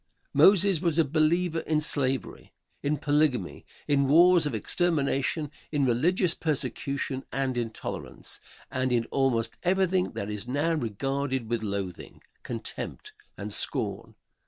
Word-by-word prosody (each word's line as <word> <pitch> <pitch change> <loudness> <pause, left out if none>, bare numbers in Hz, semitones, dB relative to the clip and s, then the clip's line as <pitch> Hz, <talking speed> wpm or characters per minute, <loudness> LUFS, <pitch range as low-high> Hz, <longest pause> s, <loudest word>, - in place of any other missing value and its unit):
Moses 195 -3 +5
was 170 -3 0
a 165 - +4
believer 165 +3 +1
in 155 -1 0
slavery, 135 -3 +1 0.3
in 150 +1 0
polygamy, 145 - 0 0.2
in 140 -1 +2
wars 170 +2 +6
of 135 - -3
extermination, 150 - 0 0.2
in 145 -3 +1
religious 165 +8 +2
persecution 140 -2 -2
and 135 -2 -1
intolerance 115 -2 -5 0.3
and 130 0 -1
in 120 -2 +1
almost 130 -4 0
everything 185 0 +1
that 100 +1 -4
is 105 +2 -5
now 145 +6 0
regarded 135 0 -2
with 120 -2 0
loathing, 100 -4 -5 0.2
contempt 125 - -6 0.2
and - - -4
scorn. - - +1
140 Hz, 125 wpm, -27 LUFS, 125-165 Hz, 0.3 s, wars